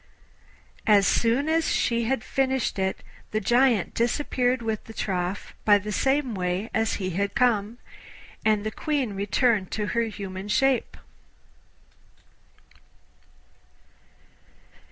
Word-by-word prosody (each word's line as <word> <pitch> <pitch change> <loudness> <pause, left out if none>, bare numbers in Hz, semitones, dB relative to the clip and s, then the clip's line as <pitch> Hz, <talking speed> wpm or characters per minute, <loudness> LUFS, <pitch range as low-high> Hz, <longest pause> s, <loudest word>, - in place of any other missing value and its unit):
As 205 -2 +6
soon 235 +8 +2
as 320 0 +1
she 235 -1 +1
had 245 -1 -1
finished 265 -5 -1
it 190 0 -2 0.3
the 215 - -1
Giant 240 -1 +2
disappeared 250 0 0
with 220 -2 -3
the 225 - -11
trough 185 0 -3
by 205 -1 +6
the 205 +1 -5
same 270 +3 +1
way 185 +3 -2
as 220 0 +1
he 185 -2 -3
had 200 +3 -2
come, 235 -4 +1 0.7
and 215 -1 +2
the 215 - -3
Queen 275 -4 -2
returned 200 +1 +1
to 210 - -1
her 235 -1 +1
human 195 -3 -6
shape. 265 +4 +1
220 Hz, 115 wpm, -25 LUFS, 200-250 Hz, 0.7 s, As